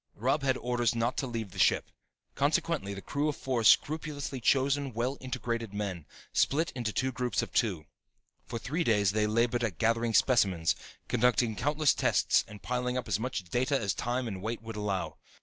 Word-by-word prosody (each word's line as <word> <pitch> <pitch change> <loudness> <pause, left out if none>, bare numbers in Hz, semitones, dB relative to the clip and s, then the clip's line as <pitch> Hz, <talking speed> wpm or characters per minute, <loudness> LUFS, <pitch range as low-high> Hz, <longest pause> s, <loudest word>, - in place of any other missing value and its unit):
Robb 135 +7 +1
had 135 -2 +1
orders 120 -1 0
not 115 +2 0
to 135 - -1
leave 115 -5 -4
the 95 - -9
ship. - - +3 0.4
Consequently, 100 +1 0
the 95 - -8
crew 145 +2 -1
of 150 - -2
four 125 -3 -2
scrupulously 145 +1 +2
chosen, 135 +1 +2
well 125 +4 -1
integrated 115 -4 -3
men 95 -7 -4 0.3
split 160 +4 +2
into 120 -4 -3
two 130 +5 0
groups 125 -3 -1
of - - -8
two. 95 -10 0 0.6
For 120 - -4
three 150 +9 -2
days 105 - +3
they 105 +1 +1
labored 120 +2 +1
at 100 -8 -2
gathering 115 +1 +1
specimens, 95 -10 +3 0.3
conducting 120 -1 +2
countless 150 +4 +2
tests - - +2
and 105 -1 -12
piling 125 0 -1
up 125 - -3
as 105 -1 0
much 120 -4 -3
data 130 - 0
as 100 -4 0
time 125 +1 -2
and 95 -4 -5
weight 115 +2 -4
would 115 -1 -7
allow. 105 -3 -2
120 Hz, 185 wpm, -30 LUFS, 105-130 Hz, 0.6 s, ship